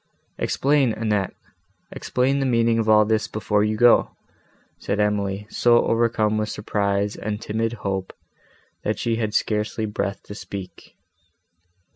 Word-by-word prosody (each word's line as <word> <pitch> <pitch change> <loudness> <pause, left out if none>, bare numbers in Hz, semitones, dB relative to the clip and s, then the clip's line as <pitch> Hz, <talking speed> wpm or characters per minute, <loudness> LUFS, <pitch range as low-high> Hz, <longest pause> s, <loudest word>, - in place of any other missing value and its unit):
"Explain, 140 -4 +2
Annette, 105 -4 -1 0.6
explain 135 +2 0
the 135 - 0
meaning 115 -2 +2
of 110 -1 0
all 105 0 +6
this 110 0 0
before 105 -1 0
you 105 0 0
go," 120 +1 +5 0.7
said 100 - -2
Emily, 105 -1 0
so 120 -1 +4
overcome 115 -2 +1
with 105 0 -2
surprise 100 -1 -1
and 105 -1 -4
timid 115 +1 -2
hope, 95 -1 -2 0.7
that - - -1
she 115 -1 -1
had 110 -2 -2
scarcely 105 +1 0
breath 105 -1 -3
to - - -9
speak. 100 -3 -9
110 Hz, 135 wpm, -23 LUFS, 105-115 Hz, 0.7 s, all